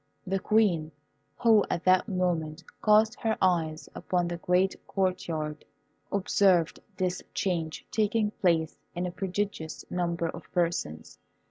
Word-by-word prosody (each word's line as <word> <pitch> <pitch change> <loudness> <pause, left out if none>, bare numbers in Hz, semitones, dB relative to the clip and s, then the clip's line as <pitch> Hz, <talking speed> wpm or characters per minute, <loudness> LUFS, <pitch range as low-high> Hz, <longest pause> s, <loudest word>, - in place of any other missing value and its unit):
The 195 +1 0
Queen, 185 -7 +2 0.5
who 225 -4 +5
at 170 - -2
that 185 +2 +4
moment 175 -4 -1 0.2
cast 215 +2 +4
her 225 -2 0
eyes 165 -4 +1
upon 175 -1 -1
the 175 - -3
great 180 +2 +2
court 185 -2 -1
yard, 155 -2 -3 0.5
observed 190 -3 +3 0.2
this 185 -1 -1
change 165 -4 -2
taking 215 0 +1
place 165 -6 +1 0.2
in 175 +1 -1
a 180 - -3
prodigious 185 -4 -3
number 170 -1 -1
of 165 +1 -8
persons. 170 - -2
180 Hz, 130 wpm, -28 LUFS, 165-195 Hz, 0.5 s, who